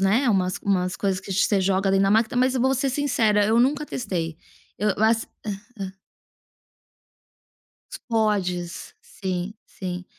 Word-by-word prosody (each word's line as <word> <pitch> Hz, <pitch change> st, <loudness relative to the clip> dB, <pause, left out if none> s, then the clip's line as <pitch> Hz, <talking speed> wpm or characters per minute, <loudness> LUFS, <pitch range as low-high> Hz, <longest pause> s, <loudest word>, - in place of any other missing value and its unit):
né, 225 Hz, +7 st, +3 dB
umas 185 Hz, -3 st, +1 dB
umas 185 Hz, -2 st, 0 dB
coisas 195 Hz, -2 st, -1 dB
que 195 Hz, -, -10 dB
você 195 Hz, +1 st, +2 dB
joga 190 Hz, +1 st, +2 dB
ali 195 Hz, -, +3 dB
na 195 Hz, 0 st, +3 dB
máquina, 220 Hz, +3 st, +2 dB
mas 255 Hz, +1 st, +3 dB
eu 255 Hz, -, 0 dB
vou 265 Hz, +2 st, +3 dB
ser 270 Hz, +1 st, 0 dB
sincera, 235 Hz, -7 st, +2 dB
eu 225 Hz, +3 st, +3 dB
nunca 285 Hz, +4 st, +2 dB
testei. 170 Hz, -, -3 dB, 0.4 s
Eu 210 Hz, +3 st, +1 dB
as 225 Hz, +1 st, +2 dB, 0.2 s
hã 210 Hz, -, -1 dB, 0.3 s
hã 190 Hz, -1 st, -4 dB, 2.0 s
Os -, -, -6 dB
pods. 195 Hz, -7 st, -1 dB
Sim, 185 Hz, 0 st, -4 dB
sim. 180 Hz, -1 st, -6 dB
200 Hz, 155 wpm, -24 LUFS, 185-230 Hz, 2.0 s, né